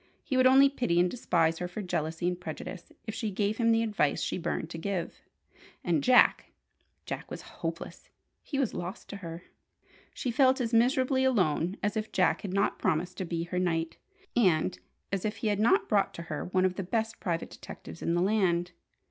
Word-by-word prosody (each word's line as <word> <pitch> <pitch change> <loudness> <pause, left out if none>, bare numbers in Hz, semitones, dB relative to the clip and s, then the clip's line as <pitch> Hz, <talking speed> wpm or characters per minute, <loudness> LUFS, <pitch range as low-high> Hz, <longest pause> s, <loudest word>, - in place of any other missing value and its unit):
He 265 - -2
would 255 0 +6
only 270 +2 +7
pity 245 -11 0
and 180 0 +3
despise 165 -8 +1
her 180 - -2
for 195 +4 -6
jealousy 165 -1 -2
and 180 0 -2
prejudice 170 +2 -7
if 220 - -4
she 220 -1 -2
gave 205 +2 -1
him 230 -1 +3
the 225 0 +3
advice 205 -10 +1
she - - -2
burned 165 -1 -3
to 165 - -5
give. 185 0 -3 0.6
And 165 -5 +1
Jack 255 -1 +5 0.5
Jack - - -5
was - - -7 0.2
hopeless! - - -5 0.3
He 280 - -4
was 270 -5 0
lost 175 +2 -6
to 200 - -6
her. 170 -2 -8 0.7
She 250 - -3
felt 260 +2 +4
as 235 -2 -2
miserably 260 +3 +3
alone 185 - +1
as 205 +2 0
if 220 0 -3
Jack - - +2
had 195 - -5
not 200 +2 +1
promised 170 +3 0
to 190 - -2
be 165 -1 -2
her 175 +1 -2
"knight," 165 -2 -1 0.4
and 160 - +2 0.3
as 195 -2 -1
if 215 0 -1
he 220 - -1
had 205 -1 0
not 385 - +3
brought 205 -3 +1
to 170 - -6
her 155 -3 -4
one 185 +1 +1
of 185 -1 0
the 195 - -2
best 225 +4 -2
private 170 -3 -2
detectives - - -10
in 170 - 0
the 175 - +2
land. 180 -4 +1
190 Hz, 200 wpm, -29 LUFS, 170-230 Hz, 0.7 s, only